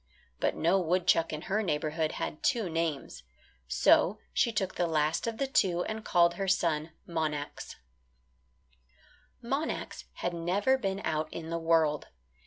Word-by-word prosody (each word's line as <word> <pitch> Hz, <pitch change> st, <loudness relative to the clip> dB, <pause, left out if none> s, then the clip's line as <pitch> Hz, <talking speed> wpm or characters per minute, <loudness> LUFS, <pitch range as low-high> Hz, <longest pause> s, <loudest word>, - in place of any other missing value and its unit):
But -, -, +1 dB
no 170 Hz, +4 st, +3 dB
woodchuck 175 Hz, -1 st, +2 dB
in 155 Hz, 0 st, -5 dB
her 210 Hz, +3 st, 0 dB
neighbourhood 155 Hz, -3 st, -1 dB
had 150 Hz, -, -4 dB
two 225 Hz, -9 st, +1 dB
names. 160 Hz, -, -2 dB, 0.5 s
So 65 Hz, -, +4 dB, 0.2 s
she 235 Hz, -, +2 dB
took 195 Hz, -4 st, -1 dB
the 175 Hz, -, 0 dB
last 155 Hz, +4 st, 0 dB
of 230 Hz, -1 st, -3 dB
the 275 Hz, -, 0 dB
two 190 Hz, -, +2 dB
and 220 Hz, 0 st, -5 dB
called 170 Hz, -3 st, +4 dB
her 195 Hz, +1 st, -3 dB
son 165 Hz, -4 st, +1 dB, 0.2 s
Monax. 155 Hz, -3 st, -3 dB, 1.7 s
Monax 275 Hz, +6 st, -3 dB
had 175 Hz, -, -3 dB
never 185 Hz, +9 st, +1 dB
been 195 Hz, -3 st, -2 dB
out 155 Hz, 0 st, -1 dB
in 165 Hz, 0 st, -6 dB
the 170 Hz, -, -1 dB
world. 165 Hz, -2 st, +2 dB
170 Hz, 145 wpm, -30 LUFS, 155-195 Hz, 1.7 s, So